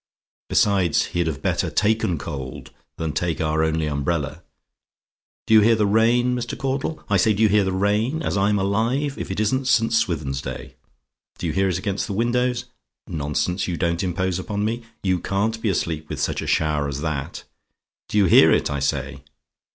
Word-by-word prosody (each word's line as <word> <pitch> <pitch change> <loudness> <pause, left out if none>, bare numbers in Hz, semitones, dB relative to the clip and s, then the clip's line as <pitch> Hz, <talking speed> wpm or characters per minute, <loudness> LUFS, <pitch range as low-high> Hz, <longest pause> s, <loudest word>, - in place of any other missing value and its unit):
Besides, 95 -6 +2
he'd 85 -1 0
have 75 -4 -4
better - - 0
taken 110 -5 +1
cold 70 -3 -7 0.3
than 80 -2 -3
take 85 0 -1
our 80 0 +1
only 80 0 0
umbrella. 75 +1 -2 1.0
Do - - +1
you 110 - +8
hear 115 +2 +5
the 110 -1 +2
rain, 120 +4 +3
Mr. 120 -1 -4
Caudle? 135 +3 -3
I 100 - +2
say, 105 +3 +3
do 110 - +1
you 110 - +5
hear 105 0 +4
the 95 - -1
rain? 105 +6 +1
And 160 0 -3
as - - -1
I'm 100 +1 +2
alive, 115 +9 0
if - - -5
it 95 - -3
isn't 130 +5 0
St. 115 -2 +3
Swithin's 75 -11 0
day! 65 -1 -7 0.6
Do - - -5
you 80 - -1
hear 95 +2 +2
it 90 - 0
against 100 -2 -2
the - - -4
windows? 125 +3 0 0.4
Nonsense; 80 +4 -2
you 90 -2 -2
don't 85 -1 0
impose 95 0 -1
upon 105 +2 -2
me. 115 +2 -2 0.2
You 95 -2 +1
can't 110 +5 -1
be 110 - 0
asleep 80 -4 -2
with - - -4
such - - -1
a - - -5
shower 75 -2 +1
as 70 0 -4
that! 75 -4 -4 0.7
Do - - -1
you 100 - +5
hear 85 - +7
it, - - +2
I 70 - -2
say? 70 0 -2
95 Hz, 195 wpm, -22 LUFS, 80-110 Hz, 1.0 s, you